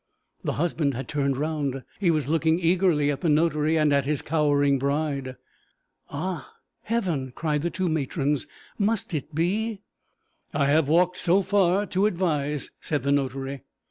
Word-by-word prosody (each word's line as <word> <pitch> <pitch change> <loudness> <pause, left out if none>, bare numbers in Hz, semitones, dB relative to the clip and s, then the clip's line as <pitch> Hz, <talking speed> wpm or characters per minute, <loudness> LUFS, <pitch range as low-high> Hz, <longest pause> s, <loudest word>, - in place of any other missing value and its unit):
The - - -1
husband 150 -3 0
had 135 - -5
turned 140 -3 0
round; 145 -3 -2 0.2
he 190 -4 +2
was 155 -5 +1
looking 160 +1 +2
eagerly 170 -4 +2
at 140 - -4
the 165 - +1
notary 155 0 +2
and 150 -2 +3
at 140 -1 +2
his 150 0 -1
cowering 145 -3 +2
bride. 140 -1 -1 0.7
'Ah, 170 +3 -5 0.3
Heaven!' 170 - -2
cried 150 -3 -1
the 170 - -1
two 185 +3 -2
matrons, 145 -2 -1 0.3
'must 210 -2 0
it 150 0 -4
be?' 200 +6 0 0.7
'I 145 -1 +2
have 145 +1 +3
walked 180 +3 +3
so 185 +3 +3
far 195 0 +2
to 195 +1 +1
advise,' 150 -7 -1
said 150 -2 -2
the 140 - +1
notary. 135 -1 -1
155 Hz, 155 wpm, -25 LUFS, 140-175 Hz, 0.7 s, and